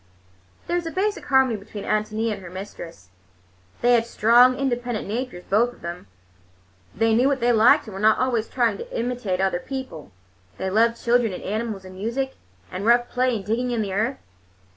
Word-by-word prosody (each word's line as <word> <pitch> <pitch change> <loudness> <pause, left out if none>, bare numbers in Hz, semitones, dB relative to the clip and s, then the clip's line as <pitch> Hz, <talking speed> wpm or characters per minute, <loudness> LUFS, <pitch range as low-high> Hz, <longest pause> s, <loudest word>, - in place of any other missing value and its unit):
There 345 - -1
was 340 -1 -3
a - - -4
basic 410 +3 -1
harmony 265 -4 +3
between 205 0 -9
Ántonia 215 +1 -1
and 200 - -8
her 180 - -9
mistress. 170 - -9 0.7
They 245 +1 +4
had 230 -1 +3
strong, 240 +3 +5
independent 245 -4 -2
natures, 225 -4 -4
both 235 +4 +2
of - - -21
them. 170 - -7 0.9
They 225 +1 +2
knew 245 +4 +4
what 275 -1 +1
they 240 0 +2
liked, 225 +2 +5
and 215 - -9
were 190 - -6
not 215 +1 +4
always 240 -4 0
trying 235 -5 0
to - - -5
imitate 235 -6 -2
other 190 -2 +1
people. 260 - -7 0.5
They 190 - -3
loved 230 +3 +2
children 235 -3 +2
and - - -7
animals 215 -1 -3
and 185 - -10
music, 235 +8 -3 0.4
and 185 +2 -5
rough 240 +2 +3
play 250 -1 +1
and 200 -3 -5
digging 240 +4 -1
in 235 -3 0
the 195 -2 -4
earth. 225 +7 0
230 Hz, 190 wpm, -23 LUFS, 200-245 Hz, 0.9 s, strong